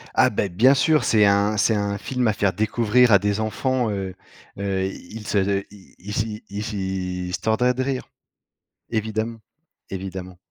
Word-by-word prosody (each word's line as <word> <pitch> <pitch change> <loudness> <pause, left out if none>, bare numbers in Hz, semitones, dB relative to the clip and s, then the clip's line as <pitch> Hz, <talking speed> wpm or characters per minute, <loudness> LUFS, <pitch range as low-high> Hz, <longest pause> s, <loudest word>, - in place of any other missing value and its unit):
Ah - - +5
ben, 100 - -1
bien 115 +10 +5
sûr, 155 +3 +3
c'est 105 -2 +4
un 100 +1 +3
c'est 110 +2 +3
un 100 -1 -1
film 125 +2 -1
à 110 - +3
faire 100 -2 +1
découvrir 115 +4 +3
à 100 - +7
des 100 +1 0
enfants, 120 +3 0
heu 95 -2 -4 0.4
heu, 95 -1 -1
ils 105 +3 -8
se 100 -2 +2
se 100 0 0
ils 105 +1 -8
y 110 0 -7
ils 105 +2 -4
y 95 -2 -3
ils 90 - -6
se - - -6
tordraient 125 +3 +2
de 130 +1 -1
rire! 130 -1 -3 0.8
Évidemment, 110 +1 -2 0.5
évidemment. 95 -1 -6
105 Hz, 175 wpm, -23 LUFS, 95-115 Hz, 0.8 s, à